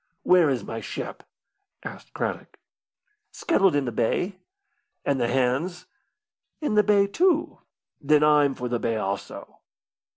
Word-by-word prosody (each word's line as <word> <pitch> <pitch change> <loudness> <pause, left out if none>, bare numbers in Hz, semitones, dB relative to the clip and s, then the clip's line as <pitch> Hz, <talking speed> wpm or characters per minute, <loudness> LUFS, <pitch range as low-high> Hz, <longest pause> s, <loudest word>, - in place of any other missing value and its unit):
"Where 180 -4 +5
is 130 -3 -1
my 115 - -5
ship?" - - -6 0.6
asked - - -10
Craddock. - - -4 0.7
"Scuttled 195 - +2
in 145 -2 +1
the 120 - -2
bay." 180 - -1 0.7
"And 140 -2 0
the 120 - +2
hands?" 135 +9 -1 0.7
"In 295 -8 -2
the 210 - +6
bay, 205 -1 +3
too." 325 - +1 0.4
"Then 150 +1 +3
I'm 150 -2 +4
for 125 - -4
the 120 -1 -1
bay, 115 -1 -1
also." 100 -2 -5
150 Hz, 135 wpm, -25 LUFS, 125-195 Hz, 0.7 s, the